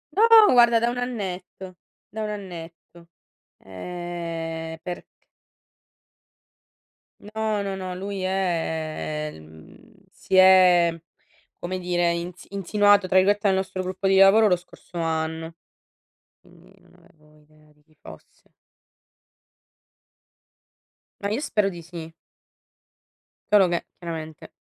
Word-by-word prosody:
Oh, 445 0 +7
guarda 235 -2 +5
da 235 +1 +1
1 245 - -4
annetto, 190 -6 -6 0.3
da 215 +2 -5
1 215 - -3
annetto. 170 -4 -10 0.5
Ehm, 165 - -6
perch 180 -1 -6 2.1
No, 215 0 -3
no, 195 -1 -4
no, 185 -1 -6
lui 195 +1 -5
è, 160 -5 -3
mhmm 80 0 -17 0.2
si - - -4
è 185 -3 +6 0.6
come 185 +1 -5
dire 175 -1 0
insi 170 +1 -6
"insinuato" 205 0 +3
tra 185 - -2
virgolette 205 +2 +3
dal 190 - +3
nostro 190 0 -3
gruppo 185 +1 -3
di 195 0 +3
lavoro 195 +3 +6
lo 180 - +3
scorso 175 0 -12
anno, 160 0 -3 0.9
quindi - - -21
non - - -25
avevo 150 -1 -24
idea 155 0 -25
di 150 - -32
chi 155 +1 -31
fosse. 80 - -16 2.7
Ma 200 - -2
io 215 +5 -1
spero 210 -8 0
di 175 -3 -9
sì. 165 -1 -9 1.4
Solo 200 -3 +6
che, 170 0 -2
chiaramente 160 -3 -8
180 Hz, 115 wpm, -24 LUFS, 165-200 Hz, 2.7 s, Oh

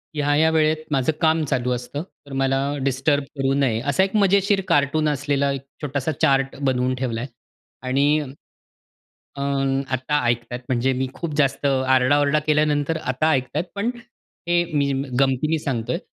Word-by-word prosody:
ह्या-ह्या 145 +2 +2
वेळेत 155 0 +2
माझं 135 0 +2
काम 160 -1 +3
चालू 125 -3 -1
असतं, 125 +4 -5 0.2
तर 140 - -11
मला 135 0 +2 0.2
डिस्टर्ब 140 +2 +1
करू 135 0 +1
नये. 135 -5 +1
असा 140 +8 +2
एक 195 +2 -2
मजेशीर 200 0 +3
कार्टून 145 +2 +2
असलेला 140 -1 0
एक 135 - -5 0.2
छोटासा 145 0 -2
चार्ट 135 -3 +2
बनवून 130 -1 +1
ठेवला 120 -3 -3
आहे 130 - -6 0.6
आणि 140 +4 +3 1.2
अ, 140 - -5
आता 135 0 0
ऐकत 120 0 0
आहेत 125 0 -4
म्हणजे 130 +1 +1
मी 130 +1 -1
खूप 170 -3 -5
जास्त 140 -1 +1
आरडा-ओरडा 135 +2 +3
केल्यानंतर 150 0 +2
आता 130 +3 0
ऐकत 130 -4 0
आहेत, - - 0
पण 205 +4 -1 0.6
हे 175 0 +3
मी 140 -1 +1
म्ह 135 +1 -3
गमतीने 135 +4 +2
सांगतो 120 -6 -3
आहे. 170 - -1
140 Hz, 160 wpm, -22 LUFS, 130-155 Hz, 1.2 s, काम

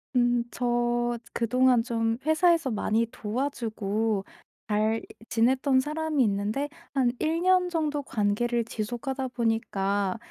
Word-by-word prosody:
음. 240 -1 +3
저 240 -1 0 0.2
그동안 250 +1 +3
좀 225 -2 0
회사에서 325 -2 +3
많이 220 +1 +1
도와주고 220 -4 -2 0.4
잘 215 +1 +1 0.3
지냈던 260 +3 +3
사람이 305 0 0
있는데 210 +7 -1 0.2
한 260 -3 +2
1 325 +2 0
년 365 0 +3
정도 305 -4 -1
관계를 235 +1 0
지속하다 245 +4 -3
보니까 205 -4 0
240 Hz, 235 characters per minute, -27 LUFS, 225-270 Hz, 0.4 s, 음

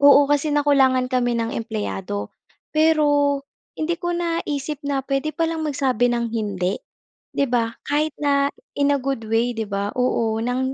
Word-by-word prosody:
Oo 285 0 +8
kasi 290 +1 +1
nakulangan 270 -3 +3
kami 245 -1 +2
ng 230 0 -1
empleyado. 205 -2 -4 0.4
Pero 290 -3 +3 0.3
hindi 335 +2 -2
ko 350 -1 -2
naisip 310 -4 -2
na 275 -1 0
puwede 275 +3 -2
pa 330 0 0
lang 320 -1 -2
magsabi 265 -5 +1
ng 235 -1 0
hindi, 200 -4 -1 0.6
'di 280 - +3
ba? 235 -3 +1 0.2
Kahit 300 +1 0
na 280 -1 +2 0.2
in 285 0 +2
a 285 - +3
good 270 -2 -2
way 235 +2 +2
'di 220 -2 -4
ba. 200 +1 -2
Oo 230 -3 +1
ng 255 +3 -1
275 Hz, 160 wpm, -22 LUFS, 235-290 Hz, 0.6 s, Oo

